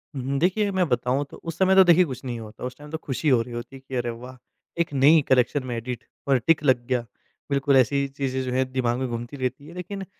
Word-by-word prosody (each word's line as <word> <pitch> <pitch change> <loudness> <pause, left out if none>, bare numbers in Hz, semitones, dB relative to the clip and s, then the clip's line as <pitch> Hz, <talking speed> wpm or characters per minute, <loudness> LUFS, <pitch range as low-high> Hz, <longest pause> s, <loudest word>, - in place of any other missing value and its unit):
हुँ, 130 - -4
हुँ। 140 +2 -1
देखिए, 200 +5 +1
मैं 185 -2 +1
बताऊँ, 125 +3 0
तो - - -10
उस 165 -1 -7
समय 190 0 +4
तो, 190 - +9
देखिए, 175 0 +6
कुछ 130 -4 -7
नहीं 120 -2 -4
होता। 110 -1 -10
उस 125 0 -5
टाइम 150 0 -12
तो 160 - -2
खुशी 150 0 -2
हो 125 -4 +4
रही 120 +1 -7
होती 120 +3 -7
कि, 130 0 -8
"अरे, 120 -1 -1
वाह! 125 +2 -8 0.4
एक 165 - -2
नई 145 +4 +6
कलेक्शन 130 +2 +3
में 120 - -3
एडिट 120 0 -5 0.2
और 135 -1 +4
टिक 165 -2 +4
लग 125 -4 +2
गया।" 125 -2 +1 0.5
बिल्कुल 140 0 +3
ऐसी 140 +2 +2
चीज़ें 135 -1 -3
जो 130 - -3
हैं, 130 0 0
दिमाग 120 -2 0
में 130 - -1
घूमती 120 +3 -6
रहती 130 +2 -3
हैं, 165 - -11
लेकिन 195 +2 -6
130 Hz, 255 wpm, -24 LUFS, 125-150 Hz, 0.5 s, तो